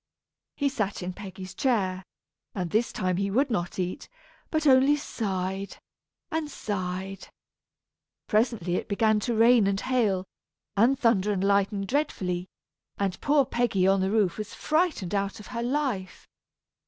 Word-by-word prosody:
He 285 - +1
sat 215 -9 -2
in 180 +1 -4
Peggy's 190 -1 -8
chair; 195 -9 0 0.5
and 180 -4 -3
this 225 +3 +1
time 185 -1 -1
he 200 +1 0
would 265 +6 +1
not 175 -4 -2
eat, 180 -1 -3 0.4
but 315 -1 0
only 270 +1 +6
sighed 195 -7 -3 0.5
and 320 -2 -2
sighed. 190 -5 -4 1.0
Presently 210 -6 +1
it - - -4
began 215 +1 +3
to 235 +2 -1
rain 230 -1 +5
and 195 0 +1
hail, 215 -8 +1 0.5
and 240 +7 +4
thunder 210 -5 +2
and 195 -2 -1
lighten 200 0 +2
dreadfully; 190 -9 -1 0.5
and 195 -2 -2
poor 285 -1 +3
Peggy 235 -7 +1
on 195 0 +4
the 190 - +1
roof 205 -3 +1
was 215 - -6
frightened 310 - 0
out 200 0 -1
of 210 - -11
her 235 - -2
life. 245 -8 -2
205 Hz, 145 wpm, -27 LUFS, 190-245 Hz, 1.0 s, only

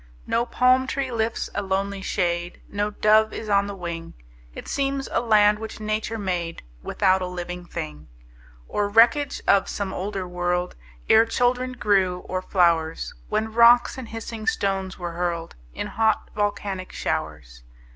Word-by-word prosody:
No 235 +1 0
palm 255 +2 +3
tree 270 -1 -2
lifts 225 -1 -2
a - - -1
lonely 195 0 -2
shade, 175 -2 -1
No 205 +1 -1
dove 215 +1 +3
is 215 - -6
on 200 0 +3
the 200 - -5
wing; 170 -2 -6 0.4
It - - -8
seems 275 -1 -1
a - - +1
land 210 -2 +4
which 220 0 -7
Nature 215 +1 -2
made 180 -5 -3 0.2
Without 190 - +2
a 185 - -2
living 180 0 -6
thing, 75 - -6 0.6
Or 205 -1 -1
wreckage 235 +7 +4
of 200 -1 +4
some 200 -2 -3
older 195 -1 -4
world, 180 0 -1 0.3
Ere 225 +1 +6
children 250 +2 +1
grew, 190 -6 +1
or 185 0 -2
flowers, 170 -4 +1 0.2
When 215 +1 -1
rocks 235 +1 +6
and 260 -4 -8
hissing 225 -1 -6
stones 195 -2 -1
were 175 -1 -4
hurled 170 -1 -3 0.2
In - - -3
hot, 220 -1 0
volcanic 200 -2 -2
showers. 70 -6 -4
200 Hz, 155 wpm, -24 LUFS, 180-225 Hz, 0.6 s, Ere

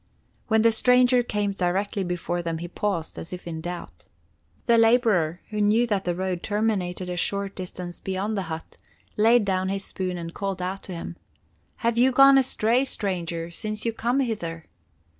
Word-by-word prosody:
When 220 -1 +3
the 230 - +6
stranger 250 +2 +4
came 210 -4 -1
directly 195 +2 -1
before 175 -1 -2
them 165 -1 -3
he 170 +2 -5
paused, 175 -2 -3
as - - -8
if 180 0 -7
in 160 -2 -5
doubt. 170 - -7 0.6
The 235 -1 +5
laborer, 220 -8 +3
who 210 0 -1
knew 215 +4 +4
that 205 -4 -1
the 175 -1 0
road 185 -1 -2
terminated 200 -4 -1
a 180 - -3
short 200 +2 -2
distance 180 -1 -7
beyond 195 +3 -2
the 195 - -1
hut, 160 0 -7 0.4
laid 225 +1 +4
down 190 -1 0
his 195 0 -3
spoon 185 -1 -3
and 170 -1 -6
called 195 -2 -3
out 185 +2 -3
to - - -4
him: 170 +1 -7 0.7
"Have 235 0 +2
you 260 +2 +5
gone 275 +1 +7
astray, 245 -1 +2
stranger, 170 -8 -3
since 215 +5 -4
you 230 - 0
come 240 +4 0
hither? 170 -10 -3
195 Hz, 180 wpm, -25 LUFS, 175-225 Hz, 0.7 s, gone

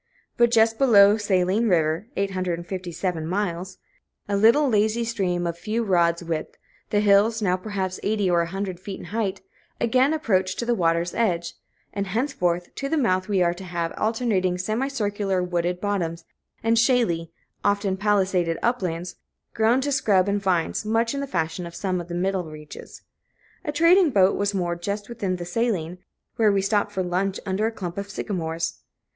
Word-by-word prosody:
But 235 0 +4
just 225 -1 +3
below 205 -6 +7
Saline 205 +2 +1
River 165 +2 +1
(857 180 -2 -3
miles), 185 -1 -3 0.5
a 205 - 0
lazy 220 -1 +4
little 235 - -1
stream 185 -6 -1
of 170 - -1
a - - -21
few 225 +4 -1
rods' 170 -4 +2
width, 165 -2 -4 0.3
the 205 - +2
hills, 210 +2 +4
now 185 -4 +1
perhaps 190 -1 -4
eighty 205 -1 0
or 175 -1 +3
a 170 - -2
hundred 190 0 -4
feet 190 +1 -7
in - - -9
height, 205 -4 -1 0.4
again 255 +4 +3
approach 190 -12 +1
to 235 - -3
the 240 - +2
water's 170 -3 +1
edge; 175 -7 0 0.4
and 200 -1 -2
henceforth 180 -6 -1
to 275 - -4
the 320 - +1
mouth 185 -8 +1
we 195 -3 +3
are 170 0 +2
to 185 +2 -10
have 170 -2 -3
alternating 215 -5 0
semi 215 +8 -1
circular, 205 -7 -1
wooded 175 0 -1
bottoms 175 -5 -2 0.4
and 225 0 +3
shaly, 230 -10 +2 0.3
often 200 -1 +1
palisaded 190 -4 +1
uplands, 180 -8 -1 0.4
grown 225 +4 +3
to 285 +2 -1
scrub 205 -8 +3
and 200 0 0
vines 180 -2 0
much 225 +3 +1
in 280 - -3
the 280 - -4
fashion 170 -3 -2
of 170 - -11
some 185 -2 -2
of 170 - -10
the 175 - -5
middle 185 -1 -1
reaches. 150 -1 -11 0.6
A 300 - -2
trading 335 +3 +5
boat 195 -6 +4
was 200 0 -1
moored 175 -2 -2
just 205 +3 -4
within 205 -6 -2
the 175 -1 -6
Saline, 180 -4 -1 0.4
where 220 -2 +4
we 195 -1 +1
stopped 205 +1 +1
for 190 -2 -2
lunch 185 +2 -1
under 195 +3 0
a - - -2
clump 185 -4 -5
of 200 0 -6
sycamores. 165 -5 -3
195 Hz, 175 wpm, -24 LUFS, 175-220 Hz, 0.6 s, below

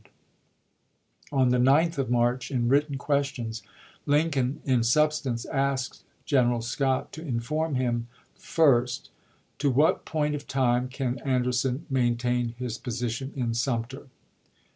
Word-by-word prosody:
d)' - - -25 1.2
On 130 -3 +3
the 125 0 +2
9th 145 +5 +3
of 130 -3 -1
March, 120 +1 +1
in 120 -3 0
written 140 +2 +2
questions, 135 -6 -2 0.5
Lin 150 +3 +3
ubl - - -2
coin 130 0 -1
in 125 -4 +2
substance 135 -2 +1
asked 135 -2 -2 0.2
General 120 -4 +2
Scott 130 +2 -1
to 160 - -7
inform 150 +2 -2
him: 120 -2 -1 0.3
1st. 130 -6 +2 0.5
To 140 - +2
what 140 +5 +3
point 150 -1 -1
of 145 -1 -5
time 125 -2 +1
can 130 -1 -3
Anderson 125 0 0
maintain 120 -2 0
his 125 -1 -4
position 125 +2 -3
in 120 -4 -1
Sumter? 120 +3 -2
130 Hz, 135 wpm, -27 LUFS, 120-140 Hz, 1.2 s, On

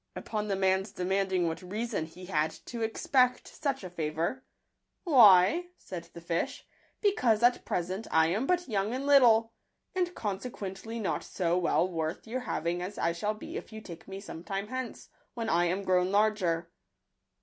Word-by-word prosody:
Upon 210 -1 -3
the 200 - 0
man's 190 +1 +1
demanding 190 -1 0
what 165 +1 -3
reason 205 -1 -3
he 180 +3 -11
had 155 -4 +1 0.2
to 235 -2 -6
expect 250 +3 +2
such 275 -5 -3
a 185 - -6
fa 160 -3 -2
vour 170 +12 -2 0.3
" - - -52
Why," 235 - +6
said 170 -2 -8
the 170 - -8
fish, 170 0 -2
(e - - -41 0.3
because 245 - +3
at 245 0 +4
present 185 +5 -2
I 160 0 +4
am 215 +10 0
but 360 -1 +1
young 210 0 -1
and 270 +2 -3
little, 230 -5 +5 0.4
and 360 -1 0
con 200 -3 -2
sequently 225 -1 -6
not 210 - -1
so 175 -2 -1
well 180 0 +2
worth 160 -2 -3
your 235 +3 -3
having 175 -7 -2
as 185 +3 -5
I 170 - +1
shall 205 +6 -2
be 215 - -7
if - - -8
you 220 - -7
take 170 -5 -11
me 195 0 -6
some 170 -4 -9
time 195 +4 -4
hence, 255 -2 -5 0.3
when 230 -2 -2
I 175 +1 +3
am 185 +3 -1
grown 185 0 +2
larger." 190 -6 +1
195 Hz, 185 wpm, -30 LUFS, 175-230 Hz, 0.4 s, Why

